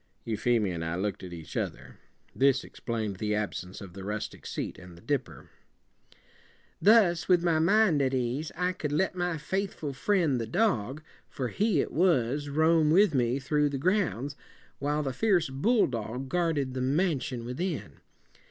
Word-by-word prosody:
'" - - -42
Euphemia 110 -3 +1
and 85 -1 -4
I 80 +1 -2
looked 100 +3 -2
at 90 - -8
each 80 -3 -9
other. - - -4 0.4
This 135 -1 +3
explained 110 -5 -4
the 105 +1 -1
absence 95 -2 -4
of 95 -3 -9
the 95 +1 -8
rustic 105 +2 -5
seat - - -4
and 90 -1 -13
the - - -15
dipper. 140 +1 -3 1.3
"'Thus, 200 -5 +5
with 175 -2 +5
my 165 -2 +2
mind 180 -2 +4
at 130 -1 +1
ease, 130 +4 -2
I 180 +1 +1
could 150 -5 -4
let 190 +6 +1
my 175 -2 -1
faith 190 +6 -2
ful 145 -3 -5
fri 190 +8 +1
end, 135 -7 +1
the 115 - -4
dog, 145 - 0 0.3
for 125 -3 -3
he 205 -8 +1
it - - -4
was, 145 -5 +1
roam 160 +1 +3
with 185 +2 +5
me 125 -1 +1
through 145 +2 +1
the 140 - -3
grounds, 145 - 0 0.4
while 150 +2 0
the 135 -2 -2
fi 225 - -2
erce 175 -9 +3
bulldog 130 - 0
guard 170 -2 +1
ed 135 -2 -1
the 130 - -3
man 145 +3 +1
si 130 +1 -4
on 115 - -7
within. 125 - -4
140 Hz, 185 wpm, -28 LUFS, 120-170 Hz, 1.3 s, Thus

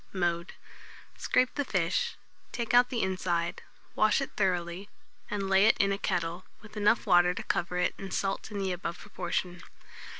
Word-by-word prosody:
Mode. 175 -2 -1 0.6
Scrape 255 0 +1
the 285 - -1
fish, 185 -8 0 0.4
take 235 -1 -3
out 245 0 +6
the 240 -3 -1
inside, 175 -2 -1 0.3
wash 215 -1 +3
it 275 - -3
thoroughly, 185 0 -1 0.4
and 200 -2 -2
lay 195 +2 +5
it - - +4
in 200 0 +2
a 195 - -1
kettle, 170 0 -2 0.2
with 210 0 -14
enough 210 +2 +2
water 175 0 +5
to - - -5
cover 175 +1 -1
it 180 - +1
and 195 -1 -7
salt 195 +2 -2
in 210 - -6
the 195 -1 -1
above 175 -1 -4
proportion. 180 -2 -4
190 Hz, 170 wpm, -29 LUFS, 175-210 Hz, 0.6 s, out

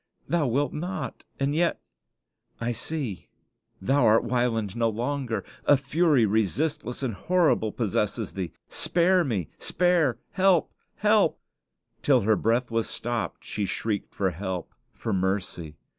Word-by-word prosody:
Thou 160 -2 +1
wilt 140 +5 0
not; 175 +5 -5
and 140 +1 +1
yet 170 +2 +1 0.8
I 115 +1 -1
see 120 - -4 0.5
thou 135 +9 +2
art 110 +1 +5
Wieland 115 -5 0
no 115 -1 +2
longer! 120 +1 -2 0.2
A 145 - +6
fury 140 -2 +3
resistless 120 - -1
and 125 -4 -1
horrible 135 - +2
possesses 105 0 -1
thee. 95 -3 -4 0.2
Spare 180 +1 +2
me 105 - -2
spare 170 -9 +2
help 190 -4 +3 0.2
help - - +3 0.3
" - - -48
Till 130 -4 +4
her 110 +2 +3
breath 120 +3 +1
was 115 -1 0
stopped 120 -1 -3
she 100 -2 -3
shrieked 105 -1 -3
for 95 -2 +1
help, 90 0 -5 0.2
for 110 - -4
mercy. 95 -4 -2
120 Hz, 135 wpm, -26 LUFS, 105-145 Hz, 0.8 s, A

